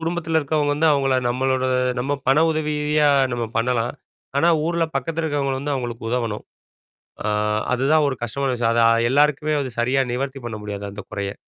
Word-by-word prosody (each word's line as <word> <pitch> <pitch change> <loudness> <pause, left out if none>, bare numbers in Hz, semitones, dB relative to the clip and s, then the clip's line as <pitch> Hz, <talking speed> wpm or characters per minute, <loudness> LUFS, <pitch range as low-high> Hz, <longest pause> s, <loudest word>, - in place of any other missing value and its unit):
குடும்பத்தில 165 -1 -1
இருக்கிறவங்க 145 0 0
வந்து, 160 +2 +3
அவங்கள 135 -2 +2
நம்மளோட 130 +1 0 0.4
நம்ம 135 +3 -1 0.2
பண 135 +2 +5
உதவியா 150 -1 +1 0.3
நம்ம 120 -1 -2
பண்ணலாம். 120 0 0 0.5
ஆனா, 165 - +4 0.2
ஊர்ல 170 -1 0
பக்கத்தில 165 +5 -2
இருக்கிறவங்கள 140 -3 -1
வந்து, 145 +1 -2
அவங்களுக்கு 120 -3 -5
உதவணும். 115 -4 -2 0.8
ஆ, - - 0 0.5
அதுதான் 145 +5 +3
ஒரு 135 - -3
கஷ்டமான 135 +3 -2
விஷயம். 115 -1 +1
அத 115 - +3 0.3
எல்லாருக்குமே 150 +2 +2
அது 130 -2 -4
சரியா, 130 +3 +2
நிவர்த்தி 135 +1 -3
பண்ண 110 -2 -6
முடியாது, 100 -1 -5
அந்த 105 0 -8
குறைய. 100 0 -3
135 Hz, 160 wpm, -22 LUFS, 120-150 Hz, 0.8 s, பண